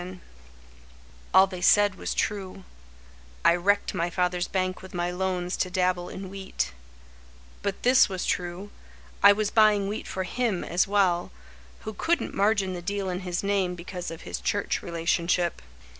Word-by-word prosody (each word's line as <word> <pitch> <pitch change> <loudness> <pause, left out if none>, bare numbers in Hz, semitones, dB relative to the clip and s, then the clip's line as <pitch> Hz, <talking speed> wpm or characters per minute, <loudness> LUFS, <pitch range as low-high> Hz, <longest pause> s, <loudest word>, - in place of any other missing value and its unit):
Ralph 175 - -7
Rhodes 185 -1 -11 1.1
All 190 +1 +7
they 185 -2 -8
said 205 +2 +5
was - - -4
true: 195 -2 -3 0.8
I 170 - +6
wrecked 200 +5 +1
my 175 -2 -1
father's 180 0 0
bank 185 -1 -2
with 190 -1 -11
my 175 0 -1
loans 180 0 -2
To 185 - 0
dabble 180 -1 0
in 190 -1 -7
wheat; 195 - -4 0.9
but 200 -1 -3
this 255 -1 +5
was 190 -2 -3
true— 180 +3 -3 0.5
I 200 - +9
was 210 0 0
buying 215 -3 +4
wheat 210 +2 -4
for 190 - -3
him 210 0 -1
as 175 +4 +1
well, 190 -4 +2 0.5
Who 220 - -6
couldn't 335 +11 -1
margin 200 -2 +1
the 175 - -5
deal 200 +1 -2
in 180 - -3
his 180 -1 -3
name 195 -3 0
Because 180 +1 -6
of 165 0 -8
his - - -5
church 205 - -1
relationship. 170 +1 0
185 Hz, 165 wpm, -26 LUFS, 180-200 Hz, 1.1 s, I